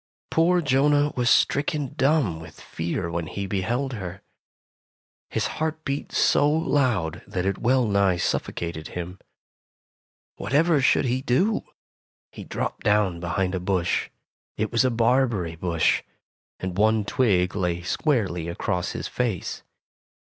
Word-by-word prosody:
Poor 175 +2 +3
Jonah 145 +1 +3
was 120 -1 +1
stricken 145 0 +2
dumb 135 - +2
with 80 - -12
fear 85 0 -4
when 85 -1 -3
he 100 +3 -4
beheld 115 +8 -1
her. 95 -5 -7 1.1
His - - -1 0.2
heart 160 0 -2
beat 140 0 -3
so 145 - +3
loud 125 - +1
that 90 -1 -3
it 100 - -1
well 125 +1 +3
nigh 100 -3 +2
suffocated 85 -2 -2
him. 90 +2 -6 1.2
Whatever 150 +2 +2
should 140 - +3
he 130 +1 0
do? 165 - +1 0.7
He - - -9
dropped - - -4
down 105 -4 +2
behind 90 +2 -1
a 95 - -1
bush. 90 -1 0 0.5
It 110 0 -1
was 115 +1 +3
a 130 - +3
barberry 115 -7 +1
bush, 85 -1 +1 0.6
and 95 -1 -4
one 110 0 +3
twig 100 -8 +1
lay 90 -3 -1
squarely 95 - 0
across 90 +2 -2
his - - -4
face. 115 -9 -2
105 Hz, 135 wpm, -25 LUFS, 90-135 Hz, 1.2 s, Poor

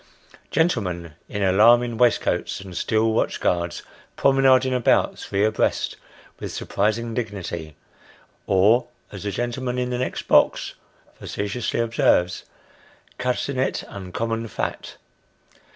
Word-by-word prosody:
Gentlemen, 90 - 0 0.2
in 105 -1 -2
alarming 115 +5 +5
waistcoats, 120 +1 +1
and 95 -2 -10
steel 110 +3 +1
watch - - 0
guards, 85 -1 -1 0.3
promenading 130 -1 +4
about, 125 -2 +2
three 100 +1 0
abreast, 110 0 0 0.4
with - - -5
surprising 115 +2 -1
dignity 95 -9 -5 0.7
(or 100 +6 +4 0.2
as 100 - -8
the 105 - -3
gentleman 120 +3 -3
in 125 0 -1
the 125 - -2
next 130 - -3
box - - +3 0.5
facetiously 105 +4 -3
observes, 110 -6 +2 0.3
" - - -30
cutting 125 +1 -1
it 130 - 0
uncommon 115 +4 -4
fat - - -4
115 Hz, 115 wpm, -23 LUFS, 100-125 Hz, 0.7 s, alarming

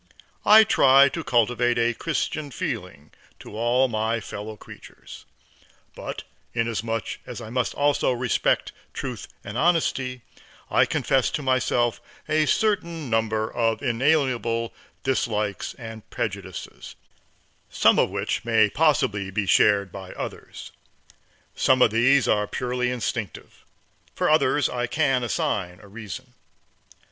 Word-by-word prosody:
I 220 +1 +9
try 140 -7 +5
to 165 +4 -5
cultivate 120 0 +2
a 120 0 +2
Christian 155 0 -3
feeling 75 - -5 0.3
to - - -11
all 120 +4 +2
my 110 0 -1
fellow 105 0 -7
creatures, - - -13 0.7
but - - -7 0.3
inasmuch 115 -1 -2
as 125 - -7
I 110 -2 -9
must 125 -1 -1
also 145 -2 +2
respect 125 -1 0 0.2
truth - - -6 0.2
and 105 +4 -5
honesty, 135 -6 +1 0.5
I - - +4
confess 135 -2 +1
to 155 -5 -4
myself 120 -2 +1 0.3
a 155 0 +2
certain 170 - 0
number 110 -1 0
of 115 0 0
inalienable 120 -3 +1 0.3
dislikes 105 -6 -1
and 110 -3 -10
prejudices, - - -6 0.7
some - - +4
of - - +3
which - - -2
may 110 -3 +3
possibly 120 -10 +1
be 100 +1 -2
shared 100 -1 +3
by 95 -2 -9
others. - - -8 0.8
Some 130 - +3
of - - +4
these 130 +4 +3
are 105 -1 +2
purely 125 +1 -2
instinctive, 120 -6 -5 0.5
for - - +1
others 150 -2 +3
I 120 -1 -2
can 135 -3 +1
assign 95 -5 -2
a - - -15
reason. 105 -1 -9
120 Hz, 125 wpm, -24 LUFS, 110-135 Hz, 0.8 s, I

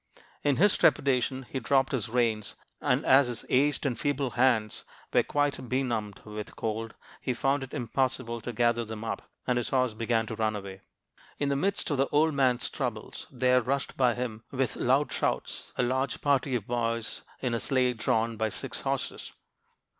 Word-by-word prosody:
In 145 -2 +2
his 200 +6 +5
trepidation 130 -1 +2
he 135 - -3
dropped 135 +2 +2
his 120 -6 -1
reins; 115 -3 0 0.3
and - - +1
as 135 0 +6
his 120 -3 -4
aged 145 +3 +2
and 125 -5 -1
feeble 140 -3 0
hands 115 -4 +2 0.3
were - - +6
quite 145 -4 -1
benumbed 115 -6 -1
with 105 0 -7
cold, 115 0 -3 0.3
he 125 - -1
found 135 +3 +1
it 135 - -8
impossible 120 -1 -1
to 120 - -4
gather 120 0 +2
them 110 -1 -6
up, 115 - -5 0.2
and 125 -1 +2
his 120 - -2
horse 130 -3 +2
began 115 0 0
to 115 0 -5
run 110 -1 0
away. 95 -2 -7 0.6
"In 145 - 0
the 140 - +1
midst 195 +7 +1
of 145 - +1
the 135 - +2
old 155 +2 +3
man's 130 -3 +2
troubles, 120 -6 -4
there 125 -1 +3
rushed 135 +3 -2
by 125 -3 +3
him, 115 -3 -4
with 135 -2 -1
loud 130 +1 +2
shouts, - - -2
a - - +2
large 130 +2 0
party 140 -2 +2
of 110 -5 -2
boys 115 -1 -2 0.2
in 125 -3 -1
a 115 - 0
sleigh 130 0 +2
drawn 115 0 0
by 110 0 0
six 100 - -4
horses. - - -3
125 Hz, 185 wpm, -29 LUFS, 115-135 Hz, 0.6 s, as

